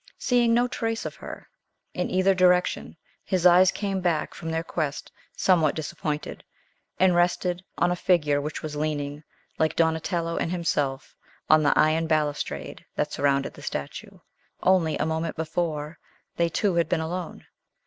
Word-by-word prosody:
Seeing 245 -2 +2
no 245 +1 +3
trace 225 -2 -3
of - - -6
her - - -9 0.5
in - - -2
either 185 +1 +3
direction, 180 -1 +2 0.3
his 185 -3 -1
eyes 180 +1 +7
came 195 -1 -2
back 170 -4 0
from 165 - -6
their 160 0 -1
quest 155 -4 -3 0.3
somewhat 165 -6 +3
disappointed, 150 -1 -4 0.6
and 185 -1 +5
rested 175 +1 +1
on 175 - +2
a - - +1
figure 150 -6 +2
which 150 +2 -5
was 155 -1 -5
leaning, 150 -1 -3 0.4
like 160 0 +1
Donatello 165 +1 0
and - - -1
himself, 145 -6 -2 0.4
on 155 0 +7
the 145 - +2
iron 160 +1 +3
balustrade 150 -2 -2
that - - -1
surrounded 140 -1 +1
the - - -13
statue. - - -6 0.5
Only 180 -4 +3
a - - 0
moment 160 +1 -2
before, 160 -1 -3 0.4
they 170 0 +1
two 195 +4 0
had 170 -1 +1
been 180 - +1
alone. 175 +2 -5
165 Hz, 155 wpm, -25 LUFS, 155-180 Hz, 0.6 s, eyes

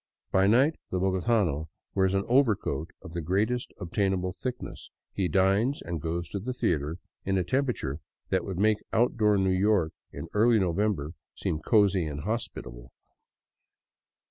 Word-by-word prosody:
By 95 +1 +4
night 130 +9 +4
the 95 - -1
bogotano 95 -4 +1 0.2
wears 95 0 +2
an 95 - 0
overcoat 110 - +2
of 80 - -10
the 85 - -2
greatest 105 +9 0
obtainable 95 0 -1
thickness, 125 -1 -6 0.2
he 95 -2 0
dines 100 +9 +2
and 85 -2 -5
goes 85 +2 -2
to 100 - -3
the 125 +6 -4
theater 75 - -1 0.3
in 95 0 0
a 90 - +2
temperature 115 - -1 0.3
that - - +1
would 95 -3 -5
make 105 +2 +3
outdoor 110 -3 +3
New 95 -1 +2
York 95 -4 +2 0.2
in - - -7
early 115 +2 +4
November 95 -4 0 0.2
seem 75 - -2
cozy 100 -4 +3
and 75 -1 -5
hospitable. 75 - -5
95 Hz, 145 wpm, -28 LUFS, 85-110 Hz, 0.3 s, By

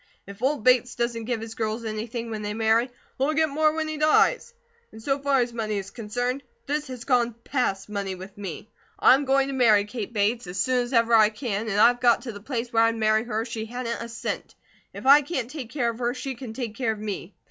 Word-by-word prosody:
If 200 +2 -11
old 270 -2 0
Bates 250 -2 +4
doesn't 235 -1 -2
give 235 -2 -2
his 225 0 -7
girls 225 +1 -3
anything 230 +2 -4
when 215 -1 -4
they 210 0 -4
marry, 225 +2 +2 0.3
they'll 290 +4 +1
get 315 0 +3
more 310 +2 +2
when 315 0 -2
he 310 0 -4
dies. 310 +11 +3 0.4
And 220 - -12
so 275 +5 -1
far 275 -2 +2
as 240 -1 -2
money 215 -2 -2
is 195 -1 -5
concerned, 245 +4 -3 0.2
this 295 +1 -2
has 250 -2 -7
gone 240 -3 +1
PAST 220 -8 -1
money 200 -2 -3
with 190 +2 -11
me. 200 -1 -7 0.3
I'm 275 +2 +5
going 270 0 +3
to - - -3
marry 220 -6 +4
Kate 220 0 -6
Bates, 215 0 0
as 180 +2 -5
soon 255 +5 +2
as 245 +1 -4
ever 230 -1 +3
I 215 -2 +7
can, 220 -1 -3
and 205 0 0
I've 245 +2 +5
got 240 -2 +4
to 245 - -5
the 205 -2 -10
place 240 0 -4
where 225 - +4
I'd 230 0 +3
marry 220 0 +2
her 220 -2 -2
if 235 - -9
she 225 -1 -4
hadn't 235 0 -4
a 235 - -6
cent. 230 - -5 0.4
If - - -9
I 280 +2 +8
can't 265 -5 -4
take 275 -7 -6
care 240 -5 0
of 230 - -11
her, 240 0 -1
she 270 - -4
can 240 -2 -8
take 235 -3 -4
care 225 -1 -1
of 215 - -10
me. 205 -3 -6
235 Hz, 245 wpm, -25 LUFS, 215-255 Hz, 0.4 s, I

